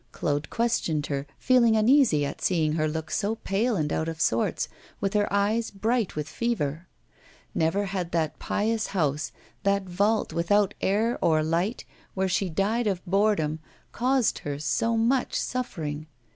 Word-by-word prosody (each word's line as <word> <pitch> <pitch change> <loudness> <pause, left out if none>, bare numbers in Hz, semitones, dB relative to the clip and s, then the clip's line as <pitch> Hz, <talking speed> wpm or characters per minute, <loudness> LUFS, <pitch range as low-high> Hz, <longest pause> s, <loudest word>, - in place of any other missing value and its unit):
Claude 145 -1 -2
questioned 170 -10 0
her, 140 0 -3
feeling 240 -3 +4
uneasy 220 - +4
at - - -6
seeing 160 -4 +1
her 155 -1 +1
look 160 0 -4
so 215 +2 0
pale 220 +3 0
and 150 -4 -1
out 160 +1 -1
of 165 -1 -6
sorts, 115 -7 +1 0.3
with 195 -1 -1
her 205 -1 +1
eyes 210 +3 +1
bright 220 +2 -1
with 150 0 -3
fever. 170 -8 -2 0.7
Never 175 +6 +1
had 185 -3 -3
that 160 -2 -1
pious 220 +1 0
house, 150 -2 0 0.3
that 200 0 +1
vault, 200 +4 0
without 200 +4 +2
air 220 +5 +1
or 155 -1 +3
light, 170 +8 -1 0.3
where 190 0 +1
she 190 +1 0
died 210 +7 0
of 190 -3 -2
boredom, 185 -5 +1 0.3
caused 255 -1 +1
her 145 -1 -4
so 225 +10 0
much 245 +3 +1
suffering. 160 -12 -3
195 Hz, 155 wpm, -26 LUFS, 160-220 Hz, 0.7 s, feeling